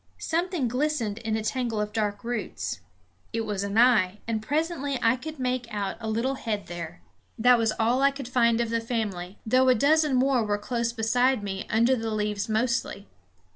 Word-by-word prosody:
Something 335 -4 -1
glistened 250 -4 -1
in 220 -1 -1
a 220 - -3
tangle 235 -1 -1
of 210 0 -2
dark 205 -2 -1
roots. 235 - -4 0.5
It 225 - 0
was 205 -2 -2
an 200 +1 -2
eye, 215 -6 +4
and 225 -1 -1
presently 285 +1 -1
I 230 +1 +3
could 310 +4 -8
make 250 -2 -2
out 205 -2 -2
a 220 - -4
little 230 +5 0
head 215 -6 -3
there. 175 0 -7 0.3
That 245 +1 +5
was 225 -1 +2
all 235 +4 +2
I 275 - +6
could 275 -2 -7
find 235 -2 +3
of 235 -1 -1
the 230 0 0
family, 210 -5 -3
though 255 +3 +4
a 255 - +6
dozen 295 +3 +3
more 255 -1 +3
were 205 -1 0
close 235 +2 -2
beside 245 +1 +1
me, 195 -1 -4
under 235 +4 +3
the 225 -2 -3
leaves 210 -1 -2
mostly. 220 -2 -1
230 Hz, 190 wpm, -26 LUFS, 210-255 Hz, 0.5 s, I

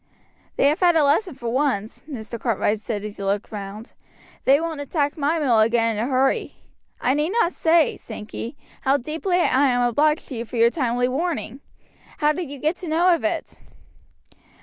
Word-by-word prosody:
"They - - +3
have 300 - 0
had 350 -2 +4
a 315 - +4
lesson 305 +4 +2
for 240 -3 -5
once," 245 -5 -1
Mr. 235 -4 -6
Cartwright 220 -2 0
said 210 -1 -4
as 210 -1 -7
he 200 - -6
looked 200 +1 -1
round, 205 +1 -8 0.5
"they 275 +2 +5
won't 325 -3 -3
attack 285 0 -1
my 305 +1 0
mill 255 -8 +3
again 230 0 +2
in 210 - -1
a - - -1
hurry. 265 0 +1 0.4
I 255 - +1
need 300 +3 0
not 355 -6 +2
say, 325 -1 +3
Sankey, 225 +4 -7 0.2
how 270 +1 +3
deeply 320 +7 -2
I 280 -3 +3
am 245 -1 +2
obliged 300 +6 +1
to 265 - -5
you 230 - -4
for 240 - -9
your 230 +1 +5
timely 245 -4 0
warning. 275 -2 -3 0.6
How 300 0 +3
did 345 -3 -5
you 285 - -7
get 310 +6 -1
to 360 - -8
know 345 +3 +4
of 335 - -1
it?" 325 0 -3
270 Hz, 195 wpm, -23 LUFS, 230-310 Hz, 0.6 s, they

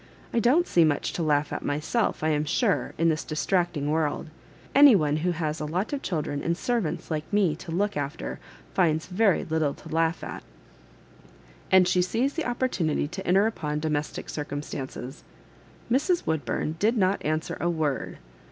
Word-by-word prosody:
I 235 - +3
don*t 280 - +3
see 170 - +4
much 150 -3 +1
to - - -3
laugh 150 -2 +1
at - - -4
myself, 155 +8 -1
I 155 - +2
am 150 -1 +1
sure, 200 - 0
in 165 +1 +3
this 155 -1 0
distracting 155 -2 0
world; 155 0 -1 0.4
any 280 -4 +8
one 150 -4 +2
who 170 +3 0
has 155 -2 -2
a 150 - -3
lot 185 - -2
of 280 - -2
children 150 - -2
and 170 0 -1
servants 180 -10 -2
like 155 -1 -3
me 195 -7 +2
to 170 - -8
look 205 +5 0
after, 100 - -4 0.3
finds 155 - +2
very 195 +1 +2
little 155 -3 0
to - - -13
laugh 165 +1 0
at.'' - - -6 1.3
And 185 -1 +6
she 180 0 +3
seized 235 +10 0
the 325 - -2
opportunity 240 - 0
to 190 +3 -7
enter 190 +4 +4
upon 150 -9 -2
domestic 150 -1 -2
circumstances. 145 -2 -6 0.7
Mrs. 335 +8 +2
Woodburn 160 0 -1
did 225 +4 +2
not 190 -1 +1
answer 155 +1 -1
a 175 - 0
word. 155 -5 -2
165 Hz, 170 wpm, -26 LUFS, 150-200 Hz, 1.3 s, any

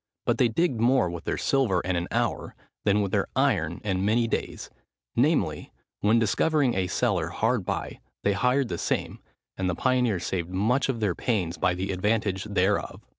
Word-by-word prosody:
But - - +1
they 125 - +5
digged 120 0 0
more 120 -7 +3
with 85 -1 -7
their - - -1
silver 125 -10 +1
in 95 0 -2
an 85 0 -2
hour, - - -2 0.3
than 105 0 +3
with 100 - -3
their - - +1
iron 80 +2 +1
in 95 -3 -1
many 115 +3 +2
daies; - - -4 0.4
namely, 115 - +1 0.3
when 105 +3 +3
discovering 130 +5 +2
a 95 -1 0
cellar - - 0
hard - - 0
by, - - -3 0.2
they 100 - +2
hired 125 +5 +1
the 85 - -3
same, - - -2 0.4
and 95 -1 -1
the 90 - -1
pioneers 125 -6 +1
saved 85 -2 -2
much 110 +10 +1
of 120 -4 -2
their 100 -4 +1
pains 90 -6 -2
by 90 - +2
the 95 +2 -3
advantage 100 0 0
thereof." 100 -1 0
105 Hz, 180 wpm, -26 LUFS, 90-120 Hz, 0.4 s, they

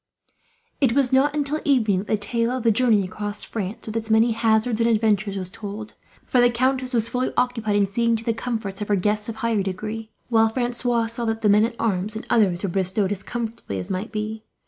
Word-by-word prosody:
It 255 -4 +4
was 265 -1 +2
not 285 +3 +3
until 295 +1 0
evening 225 -9 +2
that 200 - -6
the 215 - +1
tale 230 +3 0
of 255 -1 -2
the 230 - +4
journey 220 -2 +3
across 205 +3 -4
France, 215 +1 -5
with 220 - -6
its 225 0 -3
many 220 +2 +4
hazards 225 +1 +1
and 230 - +3
adventures, 215 -3 +1
was 185 -1 -5
told; 210 0 -7 0.3
for 250 - +3
the 245 - +5
countess 255 +2 0
was 230 -3 +1
fully 250 +2 -1
occupied 230 -4 +1
in 205 -1 +4
seeing 230 +4 +1
to 225 - -2
the 230 -1 0
comforts 220 -4 -4
of 210 - -3
her 205 - +2
guests 210 +3 0
of 225 - -4
higher 225 -2 0
degree, 215 +4 -4 0.2
while 225 -2 +4
Francois 240 0 0
saw 230 +1 -4
that 225 0 -2
the 210 - +4
men 210 +2 +5
at 230 0 -4
arms 205 -1 -1
and 220 - -5
others 190 -5 +3
were 195 - 0
bestowed 190 +2 0
as 200 -2 -3
comfortably 230 - -5
as 95 - -5
might 190 +4 -3
be. 215 0 -4
220 Hz, 225 wpm, -23 LUFS, 205-235 Hz, 0.3 s, the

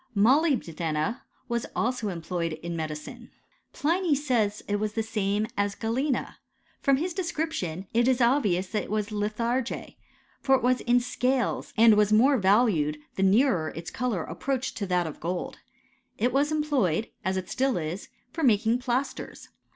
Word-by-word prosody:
Molybdena 205 - +1 0.3
was 235 -2 -2
also 235 -3 -1
employed 170 -1 -3
in 170 +2 -5
medicine. 155 -2 -6 0.4
Pliny 335 +1 +1
says 235 -7 0
It 205 - 0
was 210 0 -2
the 225 - -1
same 210 -1 0
as 200 0 0
galena. 250 +4 -2 0.4
From 275 -1 +3
his 345 +5 -2
descnption 320 - -2
^ 190 +1 -9
it 235 +2 +3
is 260 -1 +3
obvious 215 -8 +2
that 215 - -1
it - - -12
was 210 +1 -1
litharge; 230 +4 -2 0.5
for 270 - +4
it 260 - -1
was 250 0 +2
in 245 +1 +3
scales, 250 +1 0
^ - - -30
and 225 0 +7
was 210 0 +3
more 255 +5 +5
valued 190 -7 +3 0.2
the - - -2
nearer 195 - +3
its 165 +1 -6
colour 235 -9 -1
approached 265 -1 -3
x - - -9
to 200 - -1
that 180 -1 +1
of 155 - -7
gold. 175 +2 -4 0.6
It 245 +2 +1
was 285 +3 +2
employed, 270 - +1
as 190 0 0
it 185 -1 -4
still 265 -3 0
is, 170 +4 -4 0.2
for 330 - -4
j 285 - +4
making 225 +2 +3
plasters. 255 +2 -3
225 Hz, 170 wpm, -27 LUFS, 190-260 Hz, 0.6 s, and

